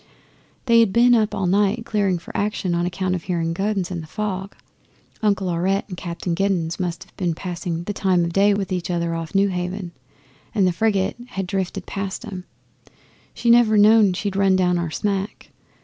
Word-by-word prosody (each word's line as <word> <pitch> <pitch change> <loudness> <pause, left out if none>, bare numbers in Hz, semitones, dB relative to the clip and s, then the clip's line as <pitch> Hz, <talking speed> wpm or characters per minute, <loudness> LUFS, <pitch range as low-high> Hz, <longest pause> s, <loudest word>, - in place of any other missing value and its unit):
They 235 -2 +5
had 225 -4 +4
been 240 +4 +5
up 220 -2 +2
all 195 - -1
night 200 +5 +1
clearing 200 -4 +1
for 170 - -11
action 200 -3 -1
on 175 +1 0
account 185 +1 -2
of 180 -3 -4
hearing 165 -2 -1
guns 195 0 -1
in 170 -2 -3
the 160 - -10
fog. 195 +1 -4 0.7
Uncle 200 -3 +1
Aurette 185 +3 0
and 180 - -5
Captain 170 0 -4
Giddens 180 -2 0
must 175 0 -3
have - - -26
been 175 -4 -1
passing 175 -1 -4
the 205 - -4
time 185 -3 +2
o' - - -1
day 200 +4 +3
with 195 -2 -3
each 180 -2 -2
other 170 -1 -1
off 165 +1 -5
Newhaven, 185 -1 0 0.6
and 200 -3 +3
the 180 - +3
frigate 200 +1 0
had 195 -5 -4
drifted 190 0 -3
past 195 +3 -5
'em. 185 -4 -7 0.9
She 235 - +2
never 235 -2 +5
knew 210 -1 +6
she'd 200 +1 -3
run 195 -1 +3
down 180 -1 +2
our 170 -1 -2
smack. 195 +4 -3
190 Hz, 190 wpm, -22 LUFS, 175-205 Hz, 0.9 s, knew